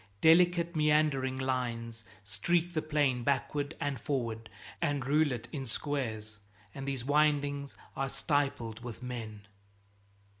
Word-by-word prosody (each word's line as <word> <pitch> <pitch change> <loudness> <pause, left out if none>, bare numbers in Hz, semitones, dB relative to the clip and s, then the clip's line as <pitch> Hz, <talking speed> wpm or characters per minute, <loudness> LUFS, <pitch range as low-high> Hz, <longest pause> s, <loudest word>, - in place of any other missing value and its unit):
Delicate 170 +1 +5
meandering 150 -4 +2
lines 120 -3 -2 0.2
streak 170 - 0
the 155 - +1
plain 145 -5 +1
backward 145 +2 0
and 140 -4 -2
forward 115 -6 -2 0.3
and 145 -2 0
rule 150 +1 +3
it 120 -3 -4
in 140 -3 -4
squares, 110 -5 -2 0.3
and 135 0 -6
these 135 -3 -2
windings 145 -1 +1 0.2
are 135 0 -1
stippled 135 -5 -1
with 120 0 -7
men. 110 -5 -6
135 Hz, 120 wpm, -31 LUFS, 120-150 Hz, 0.3 s, Delicate